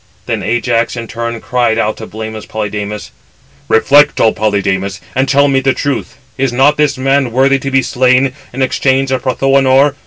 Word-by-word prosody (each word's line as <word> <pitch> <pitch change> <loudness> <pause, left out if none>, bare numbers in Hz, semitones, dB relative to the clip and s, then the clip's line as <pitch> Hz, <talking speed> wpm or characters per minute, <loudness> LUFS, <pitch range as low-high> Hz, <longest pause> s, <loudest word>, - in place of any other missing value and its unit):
Then - - -2
Ajax 120 0 0
in 115 -1 -5
turn 115 0 -4
cried 120 -3 0
out 110 -1 -1
to 110 - -8
blameless 110 0 -7
Polydamas: 105 -1 -5 0.6
"Reflect, 145 +6 +4
O 110 - +3
Polydamas, 100 -2 -1
and 130 +1 0
tell 140 0 +4
me 135 -1 +2
the 135 0 +1
truth; 140 -2 -3 0.2
is 135 -2 +1
not 135 +4 +3
this 150 -3 +1
man 135 -1 +1
worthy 135 +3 +2
to 135 0 -4
be 135 -1 +2
slain 130 +2 +2 0.2
in 130 +2 -2
exchange 135 +1 0
of 130 -1 0
Prothoënor? 135 +1 +2
130 Hz, 175 wpm, -13 LUFS, 110-135 Hz, 0.6 s, Reflect